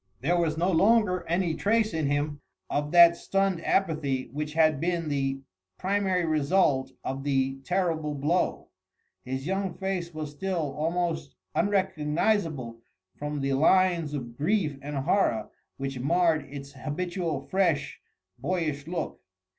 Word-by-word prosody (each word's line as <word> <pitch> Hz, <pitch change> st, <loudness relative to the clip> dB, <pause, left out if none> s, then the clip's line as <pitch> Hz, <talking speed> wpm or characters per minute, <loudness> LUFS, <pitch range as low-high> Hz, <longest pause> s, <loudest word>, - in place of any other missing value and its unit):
There 165 Hz, +7 st, +2 dB
was 160 Hz, -2 st, 0 dB
no 175 Hz, +3 st, +2 dB
longer 190 Hz, 0 st, +3 dB
any 170 Hz, 0 st, +1 dB
trace 215 Hz, +3 st, +1 dB
in 160 Hz, -3 st, 0 dB
him 145 Hz, 0 st, -1 dB, 0.3 s
of 145 Hz, 0 st, 0 dB
that 170 Hz, 0 st, +8 dB
stunned 195 Hz, -2 st, 0 dB
apathy 150 Hz, -8 st, 0 dB
which 150 Hz, +1 st, -3 dB
had 155 Hz, -3 st, +4 dB
been 170 Hz, -1 st, -1 dB
the 135 Hz, -1 st, -1 dB, 0.4 s
primary 190 Hz, -2 st, +1 dB
result 150 Hz, -3 st, +2 dB
of 135 Hz, +1 st, -4 dB
the 135 Hz, -1 st, 0 dB
terrible 165 Hz, -4 st, 0 dB
blow. 150 Hz, +6 st, 0 dB, 0.5 s
His 130 Hz, +1 st, -4 dB
young 190 Hz, 0 st, -1 dB
face 190 Hz, -3 st, -3 dB
was 155 Hz, -2 st, -5 dB
still 165 Hz, -2 st, -2 dB
almost 165 Hz, -1 st, -1 dB, 0.2 s
unrecognisable 165 Hz, -, 0 dB, 0.4 s
from 150 Hz, 0 st, -4 dB
the 135 Hz, 0 st, 0 dB
lines 170 Hz, +1 st, +3 dB
of 120 Hz, -4 st, -6 dB
grief 155 Hz, -, 0 dB
and 145 Hz, +1 st, -5 dB
horror 135 Hz, -, +1 dB, 0.3 s
which 135 Hz, -1 st, -4 dB
marred 160 Hz, +1 st, +2 dB
its 140 Hz, -1 st, -8 dB
habitual 165 Hz, +2 st, -3 dB
fresh, 170 Hz, -7 st, 0 dB, 0.4 s
boyish 150 Hz, 0 st, -2 dB
look. 170 Hz, -1 st, -4 dB
160 Hz, 130 wpm, -27 LUFS, 145-180 Hz, 0.5 s, that